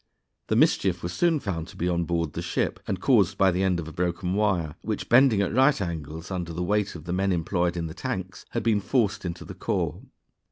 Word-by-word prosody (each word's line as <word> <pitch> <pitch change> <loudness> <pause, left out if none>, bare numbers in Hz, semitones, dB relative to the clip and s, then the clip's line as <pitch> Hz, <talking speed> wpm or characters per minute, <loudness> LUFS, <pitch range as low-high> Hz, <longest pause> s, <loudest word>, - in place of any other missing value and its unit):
The - - +1
mischief 90 -2 +2
was 85 0 -3
soon 170 - +2
found 85 -8 -4
to - - -13
be 90 - -1
on 85 -1 0
board 85 -2 -1
the - - -4
ship, - - -1
and 95 - -2
caused 100 -5 +3
by 95 -1 +4
the 90 +2 -1
end 95 -2 +2
of 80 - -5
a 80 - -8
broken 90 +2 -1
wire, 95 -7 +1
which, 110 - -3
bending 120 -4 +6
at 95 - -2
right 135 +3 +4
angles 80 -2 -5
under 90 -3 -3
the 90 +2 -2
weight 105 +1 0
of 80 - -8
the 85 +2 -4
men 95 +1 +1
employed 85 0 0
in 85 - -2
the 80 - -6
tanks, 95 0 -5
had 115 - -2
been 110 -3 +2
forced 105 -3 0
into 85 -1 -5
the - - -8
core. - - -2
90 Hz, 235 wpm, -26 LUFS, 85-105 Hz, -, bending